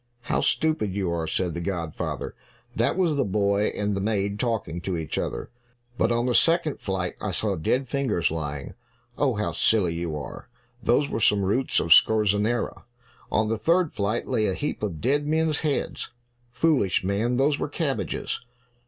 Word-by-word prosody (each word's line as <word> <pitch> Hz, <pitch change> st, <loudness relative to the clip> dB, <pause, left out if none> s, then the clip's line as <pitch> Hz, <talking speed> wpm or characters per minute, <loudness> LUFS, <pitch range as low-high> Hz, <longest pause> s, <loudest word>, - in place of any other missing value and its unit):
"How -, -, 0 dB
stupid 155 Hz, -, +1 dB
you 95 Hz, -4 st, -1 dB
are!" 85 Hz, -1 st, -2 dB
said 90 Hz, +1 st, -1 dB
the 85 Hz, -, -4 dB
godfather. 85 Hz, -4 st, -3 dB, 0.4 s
"That -, -, +1 dB
was 175 Hz, -5 st, +2 dB
the 140 Hz, -, +3 dB
boy 100 Hz, +1 st, +1 dB
and 105 Hz, -1 st, -1 dB
the 100 Hz, -, -2 dB
maid 100 Hz, -1 st, -1 dB
talking 110 Hz, -9 st, -1 dB
to 90 Hz, 0 st, -2 dB
each 80 Hz, -2 st, -3 dB
other." -, -, -4 dB, 0.4 s
"But 120 Hz, -, +1 dB
on 120 Hz, +1 st, +1 dB
the 125 Hz, -, +1 dB
second 165 Hz, +1 st, +3 dB
flight 95 Hz, -2 st, -2 dB
I 105 Hz, -, -2 dB
saw 100 Hz, +2 st, -1 dB
dead 125 Hz, +11 st, 0 dB
fingers 125 Hz, -, 0 dB
lying." 75 Hz, -3 st, -4 dB, 0.4 s
"Oh, 135 Hz, -5 st, +1 dB
how 105 Hz, +1 st, -1 dB
silly 95 Hz, -7 st, +2 dB
you 85 Hz, -2 st, -3 dB
are! 70 Hz, -, -8 dB, 0.3 s
Those 140 Hz, +5 st, +3 dB
were 110 Hz, -, -3 dB
some 105 Hz, -2 st, +3 dB
roots 115 Hz, +8 st, +1 dB
of 80 Hz, 0 st, +6 dB
scorzonera." 110 Hz, +3 st, +3 dB, 0.5 s
"On 110 Hz, 0 st, +2 dB
the 110 Hz, 0 st, -1 dB
third 165 Hz, -, +2 dB
flight 105 Hz, +3 st, -1 dB
lay 110 Hz, -4 st, +1 dB
a 95 Hz, -, 0 dB
heap 150 Hz, -, -3 dB
of 95 Hz, -8 st, -3 dB
dead 145 Hz, +4 st, +1 dB
men's 160 Hz, 0 st, +1 dB
heads." 150 Hz, -3 st, -2 dB, 0.4 s
"Foolish 130 Hz, -, +2 dB
man, 105 Hz, +6 st, 0 dB
those 140 Hz, +2 st, +2 dB
were -, -, -2 dB
cabbages." 145 Hz, -2 st, -2 dB
105 Hz, 175 wpm, -25 LUFS, 95-135 Hz, 0.5 s, of